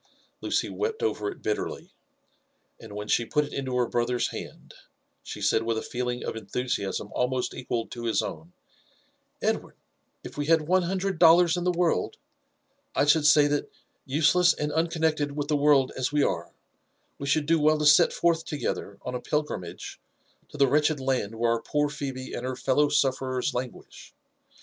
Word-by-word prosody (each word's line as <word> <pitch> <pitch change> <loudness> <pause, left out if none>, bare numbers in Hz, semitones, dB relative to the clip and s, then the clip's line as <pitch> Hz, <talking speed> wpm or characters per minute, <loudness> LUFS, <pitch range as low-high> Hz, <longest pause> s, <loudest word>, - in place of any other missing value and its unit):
Lucy - - 0
wept 445 +2 -3
over 435 -2 -1
it 395 - -10
bitter 105 - -1
ly, - - -10 0.9
and 105 -2 -11
when 105 0 -5
she 120 - +2
put 150 +6 0
it 145 - -11
into 130 -2 -3
her 125 - +2
brother's 120 +1 0
hand, - - -9 0.5
she - - -8
said 110 - +2
with 115 0 -1
a - - -3
feel 125 0 -3
ing 125 0 -4
of - - -4
enthusiasm 110 -1 -3
almost 125 0 -1
equal 120 -2 -3
to 120 -1 -8
his 115 - +1
own, 80 +2 -7 0.5
*' - - -41
Edward - - -2
I - - -44 0.4
if - - -9
we 145 - -2
had 165 -1 +4
one 185 +4 +2
hundred 190 0 -2
dollars 170 0 +6
in 175 0 -3
the 180 - +3
world, 175 -1 0 0.8
I 140 - +3
should 150 +1 +4
say 145 0 +6
that, 145 0 -1 0.3
useless 160 +5 +3
and 150 0 -2
uncon 160 +1 -1
nected 150 -3 +1
with 145 0 -4
the 150 - +2
world 145 -2 +4
as 130 +1 -1
we 145 -1 +2
are, - - -2 0.7
we 140 - -5
should 145 +2 +2
do 165 +1 +3
well 155 +1 +4
to 150 - -1
set 145 0 +6
forth 170 -1 +1
toge 150 -3 -2
ther 100 - -10
on 125 - -5
a 125 - -4
pilgrimage 95 - -4 0.5
to - - -10
the 140 - +5
wretched 150 +2 +2
land 130 -5 -1
where 115 +1 +1
our 115 -1 0
poor 150 +3 0
Phebe 135 -3 -6
and 120 - -5
her 130 0 -3
fellow 135 +3 +2
sufferers 130 -2 0
languish. 125 0 -7
145 Hz, 195 wpm, -26 LUFS, 125-155 Hz, 0.9 s, dollars